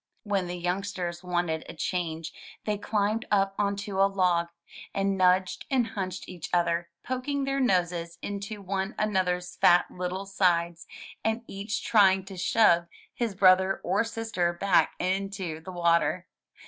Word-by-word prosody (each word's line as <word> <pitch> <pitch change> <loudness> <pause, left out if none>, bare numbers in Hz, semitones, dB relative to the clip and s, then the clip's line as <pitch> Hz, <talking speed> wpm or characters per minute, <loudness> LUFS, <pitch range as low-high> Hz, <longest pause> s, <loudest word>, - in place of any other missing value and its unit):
When 200 -4 -1
the 175 0 -4
youngsters 180 -1 -3
wanted 175 -3 -1
a - - -8
change 165 -1 -3 0.3
they 210 - 0
climbed 210 +1 0
up 195 -1 +2
onto 200 -1 -1
a 195 - +5
log, 180 -3 +2 0.5
and 195 0 +1
nudged 185 0 +2
and 250 -4 +1
hunched 190 -4 -5
each 175 -3 -7
other, 170 -1 +1
poking 260 +3 -2
their 275 0 -1
noses 175 -7 0
into 200 +1 -5
one 195 +2 -2
another's 180 -4 0
fat 175 0 +5
little 180 +2 -4
sides, 175 -3 +1 0.4
and 225 +1 0
each 205 +2 -4
trying 190 -3 +4
to 195 0 -9
shove 175 -2 +3 0.3
his 230 -5 -2
brother 190 0 +5
or 190 +5 +2
sister 225 -6 -1
back 185 +1 +2
into 190 -3 -2
the 180 +4 -9
water. 170 +1 +1
190 Hz, 145 wpm, -27 LUFS, 175-205 Hz, 0.5 s, a